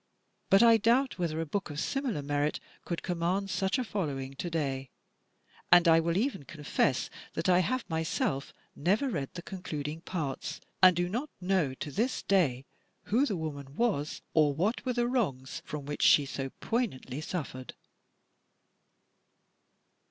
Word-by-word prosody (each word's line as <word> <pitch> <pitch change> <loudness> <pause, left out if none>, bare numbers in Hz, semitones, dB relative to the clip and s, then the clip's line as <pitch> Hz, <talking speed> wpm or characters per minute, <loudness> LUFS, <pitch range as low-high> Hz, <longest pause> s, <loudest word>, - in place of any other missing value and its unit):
But 195 +3 +7
I 230 -1 +7
doubt 240 +3 +2
whether 165 -3 -1
a 165 - -1
book 195 +4 -3
of 145 0 -5
similar 260 - -1
merit 145 +1 0 0.3
could 170 - -3
command 180 +3 -1
such 190 +3 +1
a 255 - 0
following 140 - -3
to 175 - -3
day; 135 -5 -2 0.8
and 175 0 +7
I 165 0 +7
will 170 +1 0
even 250 - 0
confess 145 -2 0 0.3
that 160 - -1
I 180 -1 +5
have 230 +6 0
myself 160 -4 -1 0.2
never 205 - +1
read 140 - -2
the 175 - -6
concluding 160 -5 -5
parts, 155 -3 -4 0.2
and 185 -1 +8
do 175 +1 +1
not 245 +11 -3
know 180 -7 +1
to 145 +2 -6
this 230 - -1
day 140 -10 +2 0.5
who 265 +6 +4
the 200 - -1
woman 145 -3 -6
was 190 -11 0
or 150 -3 +4
what 200 - 0
were 250 - +2
the 240 0 +1
wrongs 140 - -1
from 150 -2 -5
which 145 +1 -4
she 145 - +6
so 135 0 -4
poignantly 210 - -2
suffered." 140 -6 -5
170 Hz, 155 wpm, -30 LUFS, 145-200 Hz, 0.8 s, and